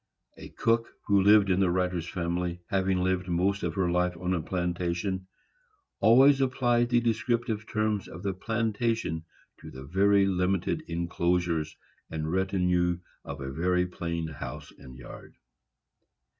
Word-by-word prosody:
A - - -11
cook 115 0 +1 0.2
who 100 -2 +4
lived 100 0 +5
in 90 - +2
the 95 -2 +3
writer's 90 -1 -1
family, 85 -1 -2
having 95 -1 +1
lived 95 0 0
most 95 +3 0
of - - -3
her 95 -3 +1
life 90 0 0
on 90 +2 -1
a 85 - 0
plantation, 90 +2 -2 0.7
always 135 +4 +6
applied 120 -2 +2
the 120 -1 +4
descriptive 115 -1 -1
terms 110 -2 0
of 85 +3 -10
the 100 -1 -1
plantation 110 -4 -1 0.3
to - - -10
the 65 +1 -10
very 100 +6 +3
limited 95 -1 0
enclosures 85 -1 -1 0.3
and 80 0 -3
retinue 90 -2 +1 0.3
of 70 -1 -7
a 65 0 -4
very 90 +4 +1
plain 85 -2 -4
house 80 -4 -8
and 65 -2 -12
yard. - - -12
90 Hz, 145 wpm, -28 LUFS, 85-105 Hz, 0.7 s, always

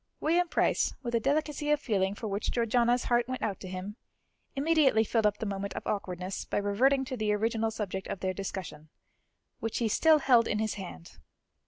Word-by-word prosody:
William 345 +3 +2
Price, - - +1
with 240 -1 -4
a 230 - +3
delicacy 295 +3 -1
of 300 -1 +3
feeling 200 -7 0
for 220 - -5
which 200 +1 -2
Georgiana's 240 +1 +2
heart 240 0 +1
went 255 0 -4
out 200 -4 -2
to 185 - -8
him, 185 +4 -6 0.6
immediately 280 -6 +3
filled 225 0 +2
up 205 0 -1
the - - -4
moment 200 -1 -4
of - - -5
awkwardness 185 -2 -3
by - - -3
reverting 255 +7 +2
to 260 - -4
the 215 -3 0
original 225 +1 0
subject 195 -3 -4
of - - -4
their 185 0 -1
discussion, 185 -5 -6 0.7
which 225 - -3
he 235 - +1
still 315 +8 +5
held 250 -5 +4
in 210 - 0
his 215 0 -1
hand. 175 - -9
220 Hz, 195 wpm, -29 LUFS, 200-255 Hz, 0.7 s, still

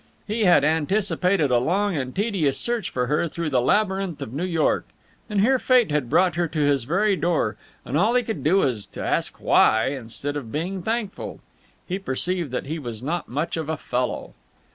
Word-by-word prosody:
He 215 +1 0
had 175 -6 +6
anticipated 180 0 +1
a 120 - +4
long 190 +8 0
and 130 -3 -3
tedious 190 - 0
search 235 -5 -1
for 125 -1 -1
her 150 +6 +1
through 165 -1 -4
the 125 -2 +3
labyrinth 190 - +1
of 110 - -6
New 160 +6 -2
York, 165 -4 +1 0.4
and 205 -2 +1
here 260 +5 +3
Fate 250 - +3
had 145 -5 0
brought 185 +5 +3
her 170 0 0
to 155 0 -4
his 145 -4 +2
very 195 - +2
door, 165 - 0 0.3
and 130 - -4
all 210 +10 +3
he 250 - +3
could 220 -1 -4
do 155 +6 +3
was 125 - 0
to - - -7
ask - - -1
why, 110 +3 +4
instead 135 +2 -5
of 125 -6 -5
being 180 +5 -3
thankful. 220 0 -3 0.5
He 185 +1 -2
perceived 175 0 -1
that 125 - -3
he 160 +4 -4
was 120 -4 -7
not 165 +5 -3
much 150 +7 -2
of 160 -2 -4
a 160 - -1
fellow. 125 -2 -3
165 Hz, 200 wpm, -24 LUFS, 140-195 Hz, 0.5 s, had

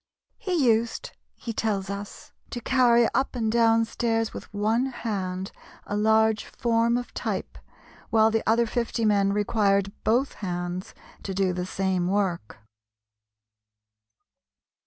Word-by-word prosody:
He 365 - 0
used, 235 - +1 0.2
he 230 - -6
tells 200 -3 -1
us, 200 0 -8 0.2
to 240 - -5
carry 240 -1 +4
up 270 0 0
and 225 -3 0
down 230 -1 +4
stairs 225 -1 -1
with - - -9
one 220 +5 +1
hand 195 -7 -4 0.3
a 205 - -3
large 220 0 +3
form 235 0 +1
of 245 - -6
type, - - -4 0.5
while 220 0 +4
the 225 0 +1
other 235 +1 +4
fifty 230 0 -1
men 200 -2 +3
required 200 -1 +1
both 245 +5 +2
hands 175 -1 -4 0.3
to 195 - -5
do 190 -1 +1
the 180 0 -3
same 190 -2 -1
work. 185 - -1
220 Hz, 130 wpm, -26 LUFS, 195-235 Hz, 0.5 s, carry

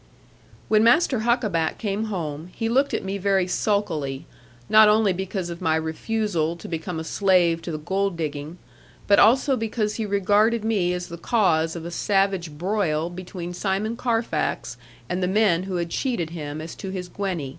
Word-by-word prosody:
When 215 0 +4
Master 255 +1 +4
Huckaback 215 -9 0
came 210 0 -2
home, 165 -5 -4
he 225 - -2
looked 270 +4 +2
at - - -3
me 195 +1 -3
very 195 -1 +2
sulkily; 165 -9 -1 0.4
not 215 0 +7
only 210 -2 +3
because 185 -1 -4
of 170 - -8
my 160 0 +2
refusal 165 +1 -1
to 170 - -10
become 165 0 -4
a - - -4
slave 175 -2 +2
to 170 - -5
the 155 - -3
gold 190 +3 -1
digging, 150 +1 -4 0.5
but 200 - +5
also 265 +4 +5
because 220 -2 -2
he 220 -2 -2
regarded 205 +3 +2
me 200 -6 +1
as 180 0 -4
the 170 0 -8
cause 170 -8 +2
of 165 -1 -6
a 170 - -5
savage 195 -2 +1
broil 175 -3 0
between 175 -1 -7
Simon 200 +5 -1
Carfax 230 -1 -1 0.3
and 180 +1 -2
the 180 - +1
men 190 -3 +3
who 185 - -2
had 170 -1 -2
cheated 180 - -1
him 155 -2 -5
as 160 +1 -7
to 195 - -6
his 185 -1 -5
Gwenny. 180 -7 -3
190 Hz, 175 wpm, -24 LUFS, 170-215 Hz, 0.5 s, not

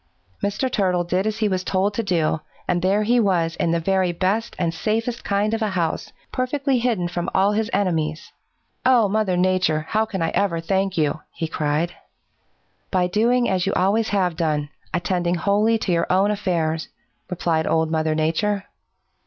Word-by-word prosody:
"Mr. 205 +6 0
Turtle 185 -8 +1
did 180 +4 0
as 215 0 -2
he 220 -1 +1
was 185 -2 -1
told 190 +2 0
to 230 - -1
do, 165 -6 0 0.3
and 175 - +1
there 195 +4 +2
he 240 +3 +3
was 175 -6 +1
in - - 0
the 170 0 +1
very 185 +1 +1
best 195 +6 -1
and 170 -2 0
safest 225 +7 -2
kind 205 +2 0
of 225 - -1
a 215 - +1
house, 170 -4 -2 0.2
perfectly 265 +1 0
hidden 230 -8 0
from 175 0 -3
all 195 +2 +4
his 220 +1 0
enemies! 160 -5 -1 0.5
"'Oh, 245 -4 +5
Mother 200 -3 0
Nature, 180 -4 +1
how 220 +1 +2
can 190 -6 -3
I 165 - +1
ever 175 -3 0
thank 190 +2 -1
you?' 155 -1 +1
he 165 - -4
cried. 155 +2 -1 1.0
"'By 185 -2 +2
doing 235 +7 +2
as 185 -1 0
you - - +1
always 210 +4 +2
have 185 -4 +1
done, 150 -3 -1 0.2
attending 175 0 0
wholly 210 +5 +2
to 210 - -2
your 170 -1 +1
own 195 +3 +3
affairs,' 165 -6 -1 0.4
replied 165 -3 0
Old 160 0 +1
Mother 160 -1 +1
Nature. 195 +6 0
185 Hz, 180 wpm, -22 LUFS, 170-210 Hz, 1.0 s, Oh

